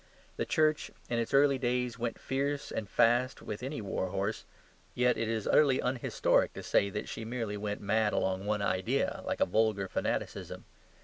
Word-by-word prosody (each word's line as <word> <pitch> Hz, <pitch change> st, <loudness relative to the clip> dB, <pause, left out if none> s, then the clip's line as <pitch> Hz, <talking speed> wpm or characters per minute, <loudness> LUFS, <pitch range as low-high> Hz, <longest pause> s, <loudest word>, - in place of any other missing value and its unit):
The -, -, -2 dB
Church 155 Hz, -1 st, +2 dB, 0.2 s
in 120 Hz, -, +1 dB
its 115 Hz, -, -2 dB
early 140 Hz, -1 st, +4 dB
days 125 Hz, -1 st, -1 dB
went 115 Hz, -1 st, -2 dB
fierce 140 Hz, +2 st, -2 dB
and 105 Hz, -3 st, -4 dB
fast 120 Hz, +4 st, +3 dB
with 105 Hz, -, -5 dB
any 135 Hz, 0 st, -4 dB
warhorse; 100 Hz, +1 st, -2 dB, 0.5 s
yet 125 Hz, 0 st, +3 dB
it 115 Hz, 0 st, -2 dB
is 110 Hz, -2 st, -1 dB
utterly 140 Hz, -4 st, +4 dB
unhistoric 125 Hz, -1 st, +1 dB
to -, -, -7 dB
say 100 Hz, -, +2 dB
that 105 Hz, +2 st, -4 dB
she -, -, -6 dB
merely 115 Hz, -2 st, -3 dB
went 105 Hz, 0 st, -4 dB
mad 105 Hz, +1 st, +2 dB
along 95 Hz, +1 st, -1 dB
one 105 Hz, -1 st, 0 dB
idea, 100 Hz, +8 st, 0 dB
like -, -, -2 dB
a -, -, +6 dB
vulgar 105 Hz, -1 st, +1 dB
fanaticism. -, -, -3 dB
115 Hz, 175 wpm, -31 LUFS, 105-130 Hz, 0.5 s, a